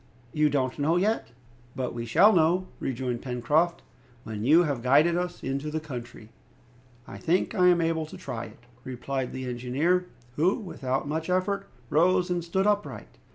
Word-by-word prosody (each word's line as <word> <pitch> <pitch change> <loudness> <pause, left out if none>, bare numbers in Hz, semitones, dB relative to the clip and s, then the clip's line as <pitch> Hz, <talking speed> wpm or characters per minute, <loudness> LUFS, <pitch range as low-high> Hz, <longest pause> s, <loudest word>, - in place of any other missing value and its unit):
"You 150 0 +3
don't 130 -1 -1
know 160 +4 +2
yet?" 210 - +1 0.5
"But 130 -2 -3
we 120 0 -5
shall 205 - +6
know," 175 +2 +3
rejoined 125 -2 -3
Pencroft, 145 +7 0 0.4
"when 110 -1 -5
you 155 +8 +6
have 140 -7 -2
guided 150 +7 +4
us 180 0 -3
into 140 +3 -2
the 160 +1 -2
country." 120 -7 -9 0.8
"I - - -9
think 180 +1 +1
I 180 -1 +4
am 175 -1 +5
able 165 -1 0
to - - -10
try 120 -4 -5
it," 110 +2 -15 0.2
replied 130 +1 -4
the 130 0 -5
engineer, 135 +9 0 0.3
who, 175 +6 +3
without 140 - -3
much 160 +3 -3
effort, 195 +2 0 0.2
rose 180 +3 +3
and 175 -1 -1
stood 190 +3 0
upright. 205 0 -2
155 Hz, 165 wpm, -27 LUFS, 130-180 Hz, 0.8 s, shall